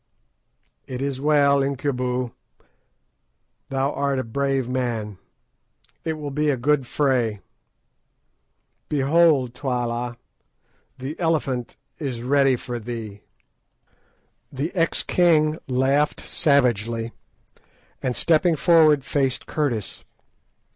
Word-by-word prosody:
"It 125 -1 -5
is 135 -1 -3
well, 145 -1 +4
Incubu; 130 -3 -1 1.4
thou 135 +1 0
art 140 -1 0
a 130 - -1
brave 135 +2 -1
man. 115 -6 -3 0.8
It 160 - -1
will 150 -2 -6
be 150 +2 0
a 140 - +1
good 135 +1 +1
fray. 120 -9 0 1.5
Behold, 145 -3 +3
Twala, 120 -2 -2 0.8
the 135 +4 -6
Elephant 135 -7 -1 0.2
is 125 -6 -4
ready 135 0 +3
for 120 0 -5
thee." 110 -3 -7 1.3
The 140 +5 -3
ex 165 -3 +1
king 160 -3 +3
laughed 135 +3 +1
savagely, 115 - +1 0.9
and 125 -2 -1
stepping 165 +1 +3
forward 155 -3 +4
faced 135 -3 -1
Curtis. 125 -10 -2
135 Hz, 95 wpm, -23 LUFS, 125-150 Hz, 1.5 s, well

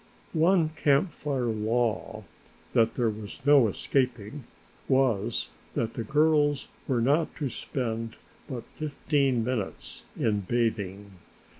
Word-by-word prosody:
One 165 0 +4
Camp 155 +2 +2
Fire 135 -4 -2
law, 110 0 -1 0.5
that 115 0 +3
there 115 -3 +2
was 105 -1 -8
no 140 -5 +7
escaping, 125 +2 -1 0.4
was 130 -7 +2 0.3
that 115 -1 -1
the 115 - -3
girls 150 0 +2 0.2
were 125 -4 +1
not 145 +7 +2
to 145 -4 -2
spend 115 -2 -3 0.3
but 125 -3 -4
fifteen 140 -4 +1
minutes 115 -4 -4 0.2
in 105 -2 +2
bathing. 100 -2 -1
125 Hz, 115 wpm, -28 LUFS, 110-145 Hz, 0.5 s, no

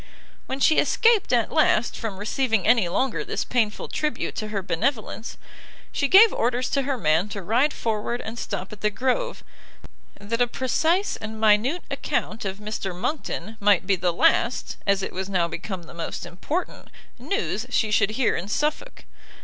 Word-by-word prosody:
When 265 - -3
she 310 +3 +4
escaped, 460 -3 +3
at 235 -3 +2
last, 270 -7 +2
from 220 -5 -5
receiving 220 0 0
any 225 -5 +4
longer 230 +7 0
this - - -2
painful 225 -4 0
tribute 305 -1 -2
to 215 - -3
her 205 -2 -3
benevolence, 220 - -2 0.5
she 280 - 0
gave 400 +7 +8
orders 245 +2 0
to 275 - +2
her 275 0 -2
man 160 +1 +2
to 200 -2 -6
ride 245 - +2
forward 225 0 -2
and 230 +1 -6
stop 195 -1 -5
at 210 - -13
the 210 - +2
Grove, 260 - -1 0.8
that 225 +4 -2
a 245 - +4
precise 320 - 0
and 220 0 -7
minute 220 +10 +3
account 220 -1 -2
of 195 0 -3
Mr 210 -3 -4
Monckton, 220 - -3
might 200 -3 +3
be 195 0 +3
the 180 -1 0
last, 235 +7 +1
as 200 -1 +2
it - - -4
was 190 +1 -4
now 180 -3 +1
become 185 +1 -6
the 165 - -13
most 170 -1 -5
important, 300 - -4 0.3
news 250 - -2
she 220 -3 +1
should 210 - +3
hear 255 -4 +2
in 180 - -4
Suffolk. 300 - -2
220 Hz, 175 wpm, -24 LUFS, 200-265 Hz, 0.8 s, gave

